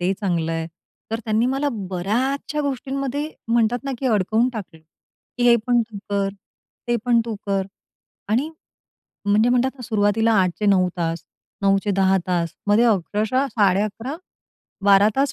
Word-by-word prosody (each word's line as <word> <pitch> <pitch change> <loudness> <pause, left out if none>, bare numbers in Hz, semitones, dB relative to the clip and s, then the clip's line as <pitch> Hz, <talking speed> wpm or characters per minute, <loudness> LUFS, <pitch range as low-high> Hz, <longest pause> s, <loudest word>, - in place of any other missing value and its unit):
ते 180 +2 +1
चांगलं 170 -4 0
आहे. 165 0 -2 0.4
तर 225 - -1
त्यांनी 220 +2 +1
मला 270 +3 0 0.2
बऱ्याचशा 255 +11 -1
गोष्टींमध्ये 275 +2 -3 0.2
म्हणतात 235 +2 +1
ना, 275 - -2
की 270 - -2
अडकवून 220 +2 +2
टाकल, 195 -7 -7 0.6
की - - 0
"हे 235 - +7
पण 240 -1 +4
तू 205 - -7
कर, 200 -1 +1 0.6
ते 240 - +2
पण 240 -1 +4
तू 230 -2 -4
कर." 195 -1 0 0.6
आणि 255 +9 +1 0.8
म्हणजे 215 +4 +4
म्हणतात 250 +2 +2
ना, 250 - -10
सुरुवातीला 220 +1 +2
8 180 - +1
चे 210 - +1
9 185 -2 +4
तास, 165 -1 -2 0.4
9 195 0 +4
चे 205 - 0
10 190 0 +3
तास, 170 -2 -1
मध्ये 210 +4 +4
अक्षरशः 220 +5 +1
11.5, 210 - 0 0.7
12 200 +1 +6
तास 280 0 +2
215 Hz, 155 wpm, -22 LUFS, 195-245 Hz, 0.8 s, हे